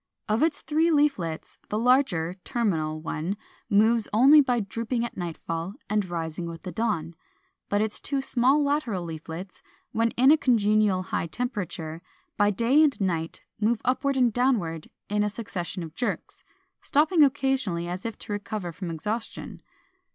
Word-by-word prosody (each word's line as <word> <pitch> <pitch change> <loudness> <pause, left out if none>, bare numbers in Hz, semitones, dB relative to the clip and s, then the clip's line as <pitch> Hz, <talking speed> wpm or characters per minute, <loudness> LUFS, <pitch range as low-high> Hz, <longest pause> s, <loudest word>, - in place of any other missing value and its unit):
Of 215 +2 +1
its 320 0 +1
three 320 +2 +2
leaflets, 280 - 0
the 210 - -1
larger 220 -9 +2
(terminal) 160 -10 -1
one 165 +4 -3 0.3
moves 220 +2 +4
only 275 +8 +7
by 250 -3 +1
drooping 230 +3 -2
at 235 - -7
nightfall 170 +1 -4 0.2
and 210 -3 0
rising 170 0 -3
with 165 -1 -8
the 185 - -5
dawn. 205 -8 -1 0.6
But 205 +1 +2
its 220 -1 -3
two 280 -1 -1
small 270 +2 +2
lateral 280 - 0
leaflets, 165 +3 -7 0.3
when 230 +1 +2
in 260 +3 +6
a 315 - +5
congenial 215 -6 +3
high 175 -2 -2
temperature, 175 -7 -4 0.3
by 205 0 +3
day 235 +9 +3
and 300 -4 +3
by 195 - 0
night 165 -3 -3 0.2
move 220 +2 +2
upward 265 +2 +1
and 245 -3 +3
downward 210 -11 0 0.2
in 210 0 +1
a 210 - +1
succession 190 -5 -5
of 160 -2 -8
jerks, 245 - -4 0.4
stopping 310 +3 +4
occasionally, 265 -11 +1
as 180 +2 -4
if 225 -2 -4
to 210 - -6
recover 205 -3 -4
from 175 +2 -6
exhaustion. 210 +8 -5
210 Hz, 160 wpm, -26 LUFS, 175-250 Hz, 0.6 s, only